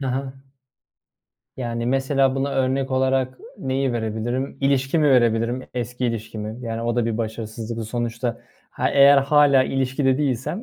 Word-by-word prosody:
Hı 135 - -3
hı. 130 +1 -3 1.2
Yani, 120 -2 -3
mesela 135 +1 +2
buna 135 +1 -1
örnek 135 +1 0
olarak 130 -1 0 0.2
neyi 135 -1 -1
verebilirim? 115 +3 -3
İlişkimi 135 +2 +2
verebilirim, 120 0 +2
eski 125 +1 -3
ilişkimi. 110 -1 -5
Yani, 115 0 -3
o 120 0 -1
da 120 -1 +1
bir 115 -1 -2
başarısızlık. 110 0 -5
Sonuçta, 120 0 -3 0.3
ha, - - -1
eğer 140 0 +7
hâlâ 140 -1 +4
ilişkide 135 +1 0
değilsem 140 - -2
130 Hz, 135 wpm, -22 LUFS, 115-135 Hz, 1.2 s, eğer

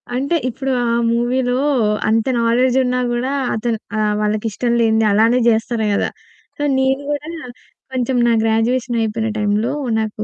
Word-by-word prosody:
అంటే, 275 +6 0
ఇప్పుడు 265 +2 -3
ఆ - - 0 0.3
మూవీలో 245 +1 0 0.5
అంత 225 0 +2 0.2
నాలెడ్జ్ 245 +2 +2
ఉన్నా 250 0 0
గూడా, 250 +3 -1 0.2
అతను 225 +1 -1 0.2
ఆహ్, 210 -1 +1
వాళ్ళకి 210 +1 -1
ఇష్టం 235 +4 -2
లేనిది 220 -1 +2
అలానే 225 +4 +3
జేస్తారు 225 0 +1
గదా! - - 0 0.5
సో, - - -6 0.2
నేను 265 +1 +1
గూడా 295 +1 -3 0.7
కొంచెం 255 0 -1
నా 235 - +3
గ్రాడ్యుయేషన్ 235 +2 0
అయిపోయిన 220 0 -1
టైంలో 210 +1 0 0.3
నాకు 215 -1 -3
235 Hz, 145 wpm, -18 LUFS, 220-250 Hz, 0.7 s, అలానే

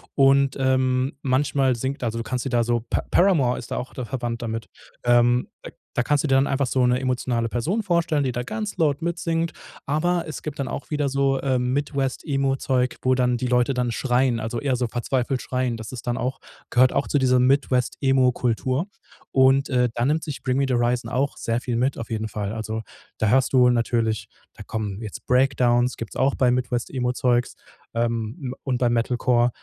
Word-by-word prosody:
Und, 135 -1 +4
ähm, 130 0 +1
manchmal 135 -1 +1
singt 130 +2 -4
also 115 0 -2
du 115 - -2
kannst 125 +1 -3
dir - - -1
da 120 -1 +2
so, 120 0 -1
Pa-Paramore 155 -11 +2
ist 115 - -10
da - - -2
auch 125 - -5
da 125 - -5
verwandt 120 -1 -4
damit. 115 -1 -4 0.4
Ähm, 120 0 +3 0.2
da - - -8 0.3
da 125 - +3
kannst 145 +2 +1
du - - 0
dir 135 - +3
dann 135 +1 +4
einfach 135 -1 0
so 125 0 +2
'ne 125 +1 +2
emotionale 125 -3 -1
Person 165 - -1
vorstellen, 170 -6 +1
die 130 - 0
da 125 0 -3
ganz 215 - -4
laut 150 -1 +1
mitsingt. 165 -1 -1 0.3
Aber 170 +4 +1
es 155 - -7
gibt 150 -2 -6
dann 135 - -1
auch 140 - -6
wieder 145 -2 0
so, 135 0 +1
ähm, 125 -2 0
Midwest 140 -2 -1
Emo-Zeug, 135 -3 0
wo 130 0 +2
dann 125 -1 +1
die 125 - -2
Leute 125 +2 +2
dann 125 -1 -1
schreien, 125 0 +1
also 115 +2 -3
eher 135 -3 0
so 125 0 0
verzweifelt 125 +2 -1
schreien. 125 -2 -1
Das 110 -1 -8
ist 125 -2 -8
dann 120 0 0
auch 130 +1 -2 0.3
gehört 125 +1 +4
auch 140 - 0
zu 145 - +1
dieser 130 -2 +3
Midwest 130 -1 +2
Emo-Kultur. 130 +1 +1 0.5
Und, 135 +1 +4
äh, 125 -2 +2
dann 120 +4 +1
nimmt 160 +1 0
sich 150 -3 -6
„Bring 130 0 0
Me 140 - +2
the 130 - +1
Horizon“ 120 +1 0
auch 135 +2 -1
sehr 115 +1 -1
viel 120 -2 -2
mit 130 +3 0
auf 115 +1 -7
jeden 110 0 -2
Fall. 105 0 -4
Also 110 0 -4 0.3
da 110 - +1
hörst 130 +2 +3
du 125 -1 +6
natürlich 115 -2 0 0.2
da - - -13
kommen 105 -1 -4
jetzt 105 -3 -8
Breakdowns, 125 -1 +2
gibt's 115 - -7
auch 135 +1 +2
bei 125 -2 +3
Midwest 125 -1 -1
Emo-Zeugs, 125 -1 0 0.4
ähm, 115 +3 -2
und 130 -3 -1
bei 120 -1 +2
Metalcore. 120 +1 +2
125 Hz, 205 wpm, -23 LUFS, 120-135 Hz, 0.5 s, du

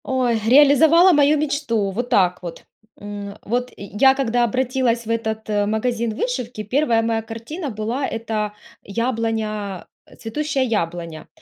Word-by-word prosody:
Ой, 250 -4 +1
реализовала 295 +6 +6
мою 295 0 +4
мечту. 285 -9 -1
Вот 245 +5 -3
так 180 -4 +2
вот. 170 -2 -8 0.4
М, 205 0 -7
э, 200 - -11
вот 245 +3 -2
я 210 +7 +3
когда 245 -3 +1
обратилась 245 0 0
в - - -8
этот, 220 -1 -2
э, 205 -1 +1
магазин 225 +1 -1
вышивки, 245 - -3
1 235 +1 +1
моя 225 0 0
картина 230 +9 -6
была- 230 +5 -3
это 220 -2 -3 0.3
яблоня, 220 -3 -3 0.3
цветущая 275 +4 -2
яблоня. 170 -7 -3
230 Hz, 135 wpm, -21 LUFS, 215-260 Hz, 0.4 s, реализовала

